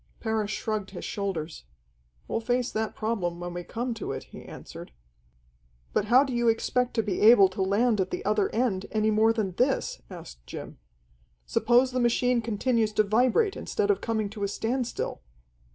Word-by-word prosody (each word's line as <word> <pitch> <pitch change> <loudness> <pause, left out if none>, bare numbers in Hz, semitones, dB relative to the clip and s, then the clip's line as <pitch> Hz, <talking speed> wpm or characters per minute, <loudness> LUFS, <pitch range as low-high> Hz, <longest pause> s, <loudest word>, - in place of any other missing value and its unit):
Parrish 220 -2 -1
shrugged 215 -3 -3
his 190 - -7
shoulders. 175 - -4 0.6
"We'll - - -1
face 245 +1 0
that 220 0 -2
problem 190 -6 -2
when 175 0 -5
we 175 0 -5
come 240 +6 -3
to 225 - -5
it," - - -6
he - - -12
answered. - - -10 1.0
"But 205 - +1
how 250 +5 +6
do 270 -3 -4
you 240 0 +1
expect 245 +2 +1
to 225 - +2
be 200 -3 -2
able 210 -3 +8
to 190 +1 -5
land 205 +3 +2
at 185 - -1
the - - -5
other 210 0 +2
end 215 -5 -1
any 215 0 +1
more 220 +1 +4
than 215 -4 -1
this?" 250 +9 0
asked - - -11
Jim. - - -8 0.7
"Suppose 245 - +3
the 255 - -1
machine 240 0 +2
continues 225 0 0
to 215 - +4
vibrate 250 - +2
instead 415 -1 0
of 400 - -1
coming 220 -2 -1
to 210 -2 -6
a - - +1
standstill?" 240 - -3
220 Hz, 180 wpm, -27 LUFS, 200-240 Hz, 1.0 s, able